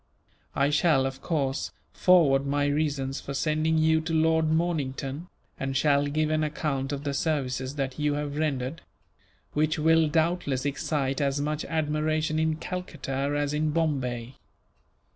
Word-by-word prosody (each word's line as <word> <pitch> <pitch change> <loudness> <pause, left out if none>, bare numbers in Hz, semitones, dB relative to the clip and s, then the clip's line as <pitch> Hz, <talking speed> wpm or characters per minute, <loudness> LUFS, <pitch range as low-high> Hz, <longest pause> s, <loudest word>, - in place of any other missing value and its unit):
I 140 +1 +2
shall, 150 -3 +3
of 135 0 -4
course, 140 -5 -1 0.2
forward 155 -7 +4
my 145 +1 +1
reasons 145 -2 -1
for 140 - -6
sending 155 +2 +1
you 160 0 +3
to 165 +1 -4
Lord 160 0 +3
Mornington, 155 -2 -1 0.3
and 135 0 -1
shall 145 0 +3
give 155 +2 0
an 155 0 +1
account 145 -3 -2
of 140 0 -4
the 140 -1 -2
services 135 -3 -1
that 135 -1 -3
you 150 -1 +1
have 145 -1 -3
rendered; 145 0 -2 0.7
which 155 +1 +1
will 160 +1 +4
doubtless 160 -4 0
excite 140 -1 -1
as 140 0 +1
much 150 +1 -2
admiration 155 0 0
in 160 0 +1
Calcutta 155 -6 -4
as 145 0 -1
in 155 +1 +1
Bombay. 135 -6 -1
150 Hz, 145 wpm, -27 LUFS, 135-155 Hz, 0.7 s, forward